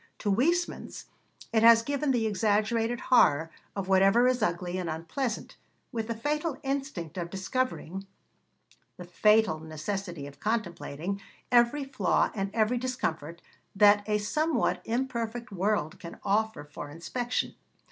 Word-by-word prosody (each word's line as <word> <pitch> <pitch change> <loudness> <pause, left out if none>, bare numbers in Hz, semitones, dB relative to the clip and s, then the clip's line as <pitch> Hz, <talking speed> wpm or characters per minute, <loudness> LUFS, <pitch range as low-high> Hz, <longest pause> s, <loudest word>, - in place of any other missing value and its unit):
To 205 - -1
Huysmans 345 - 0 0.5
it 220 - +4
has 230 0 +8
given 285 +3 -1
the 240 -4 +2
exaggerated 220 +3 +1
horror 165 - +4 0.2
of 195 -2 -3
whatever 195 +6 +5
is 255 -1 +1
ugly 175 -1 -1
and 175 -2 -3
unpleasant, 170 - -4 0.3
with 225 -3 -3
the 230 - -2
fatal 295 +4 -1
instinct 270 - -3
of 170 -1 -4
discovering, 195 -2 -3 0.9
the 180 - -8
fatal 210 -1 +3
necessity 160 +1 -5
of 140 0 -11
contemplating, 195 -4 -3 0.3
every 245 +4 +4
flaw 270 -1 +1
and 195 -2 -2
every 225 +3 +1
discomfort 170 - -3 0.3
that 205 0 +6
a 210 - +3
somewhat 305 +10 0
imperfect 235 -1 -2
world 195 -4 -1
can 170 - -9
offer 220 -2 0
for 145 0 -8
inspection. 240 +11 -3
215 Hz, 130 wpm, -28 LUFS, 175-245 Hz, 0.9 s, has